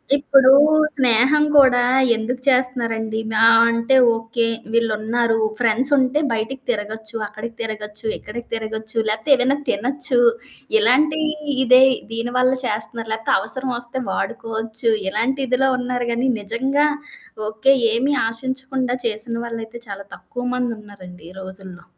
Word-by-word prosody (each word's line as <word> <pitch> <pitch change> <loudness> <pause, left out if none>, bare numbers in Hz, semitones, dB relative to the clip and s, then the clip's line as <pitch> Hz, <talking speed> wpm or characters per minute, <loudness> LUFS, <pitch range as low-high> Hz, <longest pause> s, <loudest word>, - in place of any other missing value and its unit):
ఇప్పుడు 275 -2 +4 0.4
స్నేహం 265 +3 +3
కూడా 255 -3 +6 0.3
ఎందుకు 245 +3 -4
చేస్తున్నారండి. 230 -4 0
మా 215 - +2 0.3
అంటే 230 +3 +1 0.2
ఓకే, 225 +1 -2 0.3
వీళ్ళున్నారు. 225 0 0 0.2
ఫ్రెండ్స్ 245 +4 +2
ఉంటే 260 +3 +1
బయటికి 240 +4 -3
తిరగొచ్చు. 220 0 -4
అక్కడికి 220 +2 -8
తిరగొచ్చు, 215 0 -5
ఇక్కడికి 235 +3 -9
తిరగొచ్చు, 220 0 -5
లేపోతే 220 +7 -2
ఏమైనా 260 +3 +1
తినొచ్చు. 250 +3 0 0.6
ఇలాంటి 305 -6 +2 0.5
ఇదే, 255 +2 +7 0.3
దీని 235 +2 -3
వల్ల 255 +1 +3
చేస్తన్నారు. 220 +1 -2
లేకపోతే 225 0 -1
అవసరం 260 -1 0
ఒస్తే 245 +2 -5
వాడుకోవచ్చు. 225 +3 -3 0.2
ఇలాంటిదిలో 260 +4 0
ఉన్నారు 245 -1 -3
గానీ, 250 +3 0
నిజంగా 265 +8 0 0.6
ఓకే, 220 +6 +2 0.2
ఏమి 270 +5 0
ఆశించకుండా 260 +1 -3
చేసిన 225 +1 0
వాళ్ళైతే 230 0 -7
చాలా 200 -1 -8
తక్కువ 245 0 -8
మందున్నారండి 205 -8 -7
ఈ - - -15
రోజుల్లో. 185 -2 -11
235 Hz, 115 wpm, -20 LUFS, 220-260 Hz, 0.6 s, ఇదే